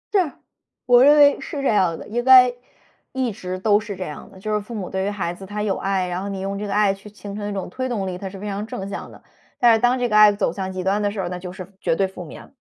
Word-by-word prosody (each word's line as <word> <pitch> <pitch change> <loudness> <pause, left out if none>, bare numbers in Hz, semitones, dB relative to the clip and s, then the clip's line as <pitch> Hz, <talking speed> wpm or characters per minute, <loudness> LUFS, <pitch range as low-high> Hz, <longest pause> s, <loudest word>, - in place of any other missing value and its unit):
是， 360 -7 +3 0.5
我 245 0 +6
认 295 +2 +7
为 285 -1 +6
是 280 -2 -5
这 - - +1
样 185 -6 +2
的， - - -10
应 240 +3 -2
该 255 -1 +7 0.6
一 260 -3 -1
直 185 -2 -6
都 205 +2 +3
是 205 -2 -7
这 185 - -5
样 150 -4 -8
的。 190 - -15
就 215 +2 -3
是 210 - +1
父 220 +3 -9
母 195 -4 -4
对 190 0 -1
于 - - 0
孩 190 -4 -3
子 190 - -12
他 210 +1 -4
有 200 -2 0
爱， 190 -2 -1
然 180 +1 -3
后 200 - -4
你 195 - -5
用 195 +1 -4
这 210 - -4
个 200 - -3
爱 205 -1 +3
去 195 +2 -12
形 205 -1 -9
成 205 0 -4
一 - - -4
种 195 -2 -4
推 260 0 -3
动 210 -6 -2
力， 185 - -4
它 195 - -5
是 195 - -10
非 210 - -6
常 205 +2 -4
正 195 -3 -6
向 200 - -7
的。 - - -16 0.3
但 235 -1 +5
是 225 - +3
当 245 +1 +3
这 245 -1 0
个 210 - 0
爱 210 -1 +8
走 200 -5 -1
向 190 0 -4
极 185 -1 -4
端 200 +2 +1
的 205 - +1
时 200 -1 -6
候， 175 -2 -2
那 180 - -5
就 180 0 -7
是 185 +1 -10
绝 165 - +1
对 195 +1 +1
负 185 -1 -9
面。 165 - -12
205 Hz, 330 characters per minute, -22 LUFS, 190-220 Hz, 0.6 s, 爱